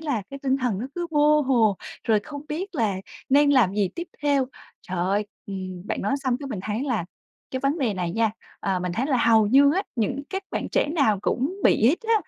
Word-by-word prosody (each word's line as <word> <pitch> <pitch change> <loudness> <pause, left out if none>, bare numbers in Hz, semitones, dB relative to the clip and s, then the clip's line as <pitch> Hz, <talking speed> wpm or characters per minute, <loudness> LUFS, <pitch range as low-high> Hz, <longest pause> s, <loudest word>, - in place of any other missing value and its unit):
là 285 -9 -1
cái 275 - -7
tinh 265 -1 +2
thần 250 -7 -1
nó 235 - -3
cứ 350 -1 -2
vô 300 0 +4
hồ, 235 -7 +3 0.3
rồi 220 -2 +3
không 285 +5 -8
biết 360 +6 -4
là 220 -8 +1 0.3
nên 285 +2 +5
làm 240 -9 +4
gì 205 -2 +1
tiếp 345 0 -5
theo. 285 -3 +2 0.4
Trời 180 -1 -3
ơi, 195 +4 +1 0.2
ừm, 185 -1 -6
bạn - - -2
nói 210 - +1
xong 255 -2 +2
cái 285 - -5
mình 220 -8 -4
thấy 215 +4 -2
là 240 -10 -1 0.5
cái 260 - -3
vấn 275 +5 0
đề 240 -8 0
này 180 -2 -2
nha, 225 +4 +1 0.3
ờ, 190 -1 0
mình 180 -1 -2
thấy 245 +9 -1
là 275 - +2
hầu 225 -3 +4
như 280 +6 +6
á 385 - +1
những 255 +5 -1
các 385 +1 -3
bạn - - -3
trẻ - - +3
nào 225 - +3
cũng 310 +11 -1
bị 220 - +5
hết 285 - +4
á. 455 - +5
255 Hz, 235 wpm, -24 LUFS, 205-285 Hz, 0.5 s, như